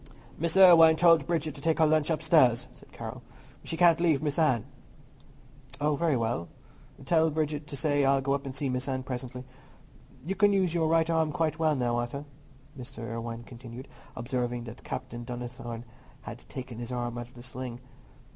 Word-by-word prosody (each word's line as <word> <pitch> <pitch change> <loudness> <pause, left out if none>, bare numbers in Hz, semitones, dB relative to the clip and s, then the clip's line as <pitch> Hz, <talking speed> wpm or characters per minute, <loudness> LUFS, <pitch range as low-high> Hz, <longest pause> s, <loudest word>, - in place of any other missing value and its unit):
"Miss 170 +3 0
Irwine 165 -4 +8
told 165 0 +5
Bridget 160 -3 -1
to 140 - -11
take 160 +1 +1
her 160 - +5
lunch 155 0 +2
upstairs," 155 -7 +3
said - - -18
Carroll; - - -7 0.4
"she 165 - -4
can't 170 -2 +5
leave 160 -4 +2
Miss 145 +1 -1
Anne." 130 -9 +2 1.1
"Oh, 150 0 +1
very 160 -2 +1
well. 115 -7 -2 0.6
Tell 160 -1 +3
Bridget 150 -1 -2
to 140 - -6
say 145 -1 +1
I'll 135 0 +4
go 135 +1 0
up 140 0 -2
and 135 -2 -7
see 140 +1 -2
Miss 125 +1 -2
Anne 130 -1 -2
presently. 125 0 -6 0.8
You 185 - -1
can 205 +1 +3
use 185 -4 +1
your 165 -2 +1
right 165 0 +3
arm 160 -2 +1
quite 160 -1 -1
well 155 -2 +2
now, 120 -2 0
Arthur," 120 +4 -4 0.5
Mr. 125 -3 -8
Irwine 115 0 -5
continued, 120 +1 -10 0.3
observing 120 0 -2
that 115 +1 -10
Captain 120 -2 -6
Donnithorne 120 -1 -6 0.4
had - - -8
taken 125 -3 -7
his 120 +1 -6
arm 120 -1 -3
out 120 - -6
of 125 - -22
the 120 - -11
sling. 125 -1 -7
140 Hz, 185 wpm, -28 LUFS, 120-160 Hz, 1.1 s, Irwine